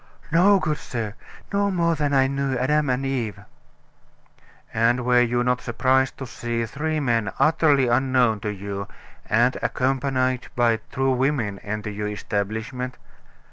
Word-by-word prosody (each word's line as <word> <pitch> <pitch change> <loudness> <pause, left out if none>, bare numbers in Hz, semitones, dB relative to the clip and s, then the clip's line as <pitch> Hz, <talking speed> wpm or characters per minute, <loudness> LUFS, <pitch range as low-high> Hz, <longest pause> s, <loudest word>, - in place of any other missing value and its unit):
"No, 190 +5 +5
good 155 -4 -1
sir, 110 -4 -4 0.4
no 200 0 +2
more 170 -3 +1
than 150 -3 -1
I 135 -1 +4
knew 135 -1 -1
Adam 150 +3 +1
and 130 +2 0
Eve." 115 -7 -2 1.3
"And 120 +2 +2
were 125 -1 +5
you 120 0 +1
not 125 0 +1
surprised 130 +2 +1
to 135 - -6
see 120 -1 -3
three 155 +6 -2
men 115 -7 0
utterly 150 -2 +3
unknown 125 -2 +2
to 105 - -3
you, 100 0 -5 0.4
and 120 +3 +3
accompanied 130 -1 0
by 120 -2 +3
two 135 0 +1
women, 125 -6 0
enter 105 0 -4
your 105 0 -3
establishment?" 110 +5 -3
125 Hz, 140 wpm, -23 LUFS, 115-135 Hz, 1.3 s, No